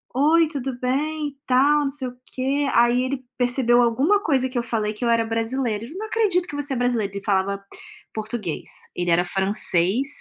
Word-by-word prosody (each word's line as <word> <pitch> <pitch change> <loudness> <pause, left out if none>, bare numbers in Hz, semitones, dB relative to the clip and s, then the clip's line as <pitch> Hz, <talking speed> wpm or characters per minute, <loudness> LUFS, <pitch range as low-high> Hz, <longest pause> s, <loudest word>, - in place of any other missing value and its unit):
“Oi, 315 +4 +4
tudo 270 -4 -4
bem?” 295 +4 -1
e 275 - -19
tal, 280 +4 +4
não 275 - 0
sei 270 -2 -4
o 245 - -14
quê. 275 +2 -1
Aí 240 +1 +4
ele 260 0 -3
percebeu 245 -1 +3
alguma 275 - +2
coisa 260 -4 +1
que 255 - -5
eu 235 - 0
falei, 220 -2 -1
que 210 - -4
eu 235 - +2
era 230 -1 +3
brasileira. 225 -1 -1
Ele: 285 +9 -9
“Não 435 +2 -5
acredito 390 -6 +1
que 290 - -7
você 285 -1 -1
é - - -1
brasileira”. 240 -5 0
Ele 200 0 -6
falava 200 0 0 0.5
português, 215 -6 -4 0.3
ele 175 0 -1
era 175 +1 +3
francês, 190 +4 +1
250 Hz, 200 wpm, -23 LUFS, 225-285 Hz, 0.5 s, Oi